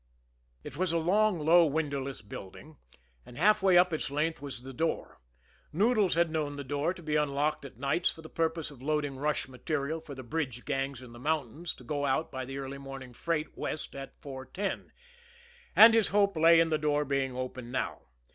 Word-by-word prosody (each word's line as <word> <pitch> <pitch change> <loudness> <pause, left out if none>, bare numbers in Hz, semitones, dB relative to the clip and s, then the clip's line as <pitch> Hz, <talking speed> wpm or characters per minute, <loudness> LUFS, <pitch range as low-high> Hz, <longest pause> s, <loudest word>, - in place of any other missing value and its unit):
It - - -8
was 185 -1 +1
a 170 - +2
long, 195 +4 +3
low, 165 +3 +6
windowless 140 -4 -2
building, 105 +9 -10 0.5
and 120 - -13
halfway 195 +1 +5
up 180 -1 +5
its 155 - -2
length 150 +2 -1
was 135 -4 -7
the 135 0 -8
door 160 - -2 0.5
Noodles 210 0 +3
had 170 -1 +2
known 150 -2 -2
the 140 - -5
door 145 +4 -1
to 180 -2 -9
be 155 -1 -1
unlocked 145 0 0
at 135 - -11
nights 140 +7 +1
for 160 - -8
the - - -8
purpose 160 -2 -1
of 135 -3 -14
loading 145 -1 -1
rush 150 0 -1
material 140 +4 -3
for 145 - -9
the 130 - -8
bridge 130 -2 -3
gangs 135 -2 -2
in 120 -2 -12
the 120 - -11
mountains 155 +3 -2
to - - -14
go 145 -2 -2
out 140 +4 0
by 130 -1 -4
the 135 +2 -6
early 140 0 -5
morning 135 -2 -9
freight 155 +4 -2
west 155 - -4
at 135 0 -9
4.10 140 +8 -5 0.9
and 225 +1 +10
his 225 -2 +4
hope 200 -1 +2
lay 165 +1 +6
in 165 0 +3
the 155 -1 +1
door 150 -1 +1
being 135 -2 -1
open 130 -1 -5
now. 130 +1 -2
150 Hz, 195 wpm, -30 LUFS, 135-165 Hz, 0.9 s, and